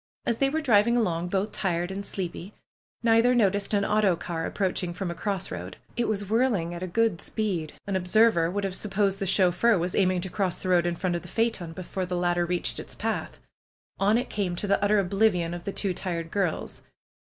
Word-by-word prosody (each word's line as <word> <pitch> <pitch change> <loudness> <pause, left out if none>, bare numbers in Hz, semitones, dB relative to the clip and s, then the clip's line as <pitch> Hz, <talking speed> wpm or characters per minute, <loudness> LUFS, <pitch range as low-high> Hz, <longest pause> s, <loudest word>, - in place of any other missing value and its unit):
As 235 -1 0
they 275 - +3
were 315 +3 -1
driving 235 -3 +4
along, 175 -6 0
both 195 +3 -1
tired 175 -1 -1
and 195 +1 -4
sleepy, 190 0 -5 0.5
neither 230 +2 +4
noticed 200 -3 +2
an 200 0 +2
autocar 180 -6 +1
approaching 185 -3 -1
from 180 0 -3
a - - -3
cross 190 +2 -3
road. 90 +1 -6 0.2
It 240 0 0
was 205 -2 -2
whirling 215 -6 +1
at 170 - -6
a 185 - -3
good 210 -2 +1
speed. 185 -8 -2
An 200 - -2
observer 215 +5 +4
PRUE'S - - -11
GARDENER 165 -1 +2
m - - -6
would 205 - -1
have 195 -1 -2
supposed 195 0 0
the 195 - -1
chauffeur 190 +4 +4
was 175 +1 -1
aiming 185 -2 +2
to 190 - -4
cross 190 -4 0
the 185 - -5
road 175 -1 +4
in 175 - -1
front 175 0 -1
of 170 - -2
the 175 - -12
phaeton 210 -6 -1
before 185 +1 -4
the 180 0 -2
latter 175 0 +1
reached 175 0 -1
its - - -9
path. - - -3 0.6
On 205 +3 +4
it 245 - -3
came 190 -4 -1
to 180 - -3
the 200 0 +1
utter 210 +1 +4
oblivion 190 -3 +2
of 175 0 -7
the 200 - -2
two 195 -1 -1
tired 170 -2 -4
girls. 195 -5 -2
190 Hz, 220 wpm, -27 LUFS, 175-210 Hz, 0.6 s, driving